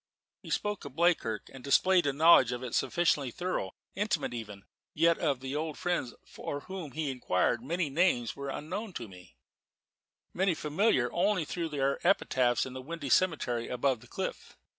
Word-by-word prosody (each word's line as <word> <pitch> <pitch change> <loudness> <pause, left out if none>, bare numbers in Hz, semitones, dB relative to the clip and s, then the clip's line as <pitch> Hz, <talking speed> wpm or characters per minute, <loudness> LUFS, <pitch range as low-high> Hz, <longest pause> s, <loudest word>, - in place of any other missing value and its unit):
He - - -11
spoke 205 -1 -1
of 140 -3 -9
Bleakirk, 160 - +1
and 130 -2 -11
displayed 175 +4 +4
a - - +3
knowledge 140 -4 +6
of 125 +1 -4
it 125 - -5
sufficiently 150 -6 +1
thorough 150 - -3 0.2
intimate 210 - -1
even 105 -4 -7 0.3
yet 165 +2 +3
of 140 -6 0
the 135 +1 -4
old 155 0 -3
friends 175 -9 -2
for 145 - -6
whom 185 -6 -7
he 155 -3 -2
inquired 120 -3 0
many 165 +6 -1
names 140 -6 +1
were 140 0 -5
unknown 190 +9 -5
to 115 - -6
me, 90 -2 -15 1.0
many 185 -2 +1
familiar 150 - +1
only 180 -1 +1
through 165 +1 -3
their 140 -2 0
epitaphs 130 -9 +2
in 130 - -7
the 130 - -6
windy 150 0 -6
cemetery 135 -10 +2
above 125 0 0
the 120 - -16
cliff. - - -5
145 Hz, 170 wpm, -30 LUFS, 125-175 Hz, 1.0 s, knowledge